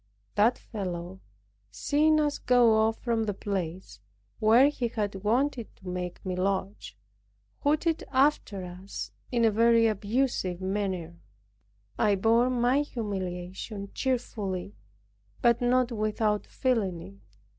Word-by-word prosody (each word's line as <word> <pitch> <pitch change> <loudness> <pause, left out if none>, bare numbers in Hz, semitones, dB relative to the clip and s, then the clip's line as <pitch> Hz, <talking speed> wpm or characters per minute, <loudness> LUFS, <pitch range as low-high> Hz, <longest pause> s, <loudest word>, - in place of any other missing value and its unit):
That 225 +4 +3
fellow, 185 -3 -6 0.5
seeing 295 - +2
us 295 -1 0
go 245 -2 +4
off 220 +1 +2
from 230 -2 -1
the 205 -2 -2
place, 190 - -4 0.4
where 230 +5 +6
he 255 -5 -2
had 205 -4 -3
wanted 240 +2 0
to 190 - -15
make 180 0 -5
me 185 -1 -2
lodge, 105 - -2 0.6
hooted 310 +3 +1
after 260 -8 +2
us 180 +2 -7 0.2
in 235 -2 +2
a 225 - +4
very 230 +1 +4
abusive 215 -3 0
manner. 185 -3 -3 0.8
I 210 -2 +3
bore 230 +5 +3
my 250 +2 +2
humiliation 200 -4 -5
cheerfully, 210 - -2 0.7
but 235 0 +3
not 250 0 +2
without 215 -1 0
feeling 215 -9 0
it. 100 +1 -16
215 Hz, 120 wpm, -28 LUFS, 185-245 Hz, 0.8 s, where